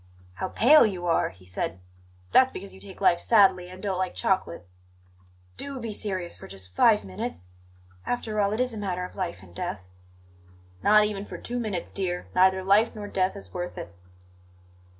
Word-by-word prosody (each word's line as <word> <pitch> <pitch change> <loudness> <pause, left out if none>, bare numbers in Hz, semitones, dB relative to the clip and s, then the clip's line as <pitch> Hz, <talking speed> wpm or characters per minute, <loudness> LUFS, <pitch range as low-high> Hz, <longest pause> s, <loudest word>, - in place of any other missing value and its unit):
"How - - -2
pale 295 +7 +6
you 185 -5 -1
are!" 170 -1 +2
he 90 0 -18
said. 90 +1 -3 0.5
"That's 260 0 +6
because 195 +1 -8
you 190 - -13
take 195 0 -9
life 175 -3 +4
sadly, 190 -5 +4
and 185 +2 -11
don't 190 -3 -1
like 185 -1 -2
chocolate 185 - -1 0.5
" 90 0 -31
"Do 280 -2 -5
be 225 -3 -4
serious 185 -5 -4
for - - -11
just 95 -1 -10
five 105 +2 +5
minutes! 90 -1 -6 0.5
After 215 - -1
all, 200 0 +2
it 215 - -2
is 250 -1 +1
a 220 - -5
matter 180 -3 -2
of - - -11
life 180 - -4
and 85 -2 -16
death." 90 +1 -5 0.9
"Not 210 - +6
even 205 -1 -3
for - - -8
two 245 +1 -4
minutes, 205 -7 -3
dear; 180 -2 -2
neither 190 +1 +4
life 205 +5 +4
nor 210 -1 -6
death 190 -1 0
is 200 - -10
worth 180 0 -5
it." 85 - -7
190 Hz, 190 wpm, -26 LUFS, 170-210 Hz, 0.9 s, pale